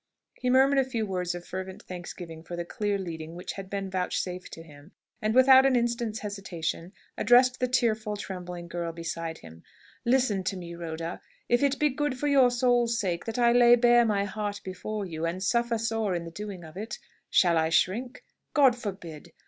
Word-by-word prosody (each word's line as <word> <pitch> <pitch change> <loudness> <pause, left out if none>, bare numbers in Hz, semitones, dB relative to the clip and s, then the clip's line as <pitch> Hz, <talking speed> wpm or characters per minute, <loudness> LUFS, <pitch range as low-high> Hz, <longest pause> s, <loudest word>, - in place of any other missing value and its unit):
He 250 - -1
murmured 270 +2 +5
a - - +4
few 240 -4 -2
words 180 -3 -2
of 175 0 -8
fervent 190 0 -6
thanksgiving 175 -2 -8
for 170 +2 -7
the 175 0 -4
clear 205 +3 -1
leading 165 -3 -6
which 180 - -6
had 195 -1 -8
been 195 -1 -3
vouchsafed 185 -1 -3
to 165 - -9
him, 150 +1 -16 0.3
and 215 +1 0
without 260 0 +8
an 270 -1 +3
instant's 235 -2 -1
hesitation 180 -4 -4 0.3
addressed 250 +3 +5
the 255 - +1
tearful, 220 -4 0
trembling 180 -3 -7
girl 170 0 -4
beside 165 0 -5
him. 80 0 -14 0.4
"Listen 240 -6 +2
to 195 - -1
me, 170 -1 -8
Rhoda. 165 0 -5 0.3
If 240 +2 +3
it 280 0 +2
be 300 - +3
good 290 -1 -2
for 295 - -1
your 270 -3 +5
soul's 240 -1 +2
sake 175 -3 -2
that 225 0 -4
I 240 -1 +4
lay 240 0 +7
bare 240 0 +5
my 205 -3 +1
heart 205 0 -4
before 195 +3 -5
you, 165 -3 -6
and 180 +3 -3
suffer 235 +3 +1
sore 225 -3 -1
in 170 -1 -3
the 165 - -8
doing 200 -1 -7
of 160 0 -12
it, 215 +3 -5 0.3
shall 175 -2 +4
I 160 0 +1
shrink? 230 - 0 0.3
God 270 -5 +6
forbid! 190 -9 -8
200 Hz, 195 wpm, -27 LUFS, 175-240 Hz, 0.4 s, without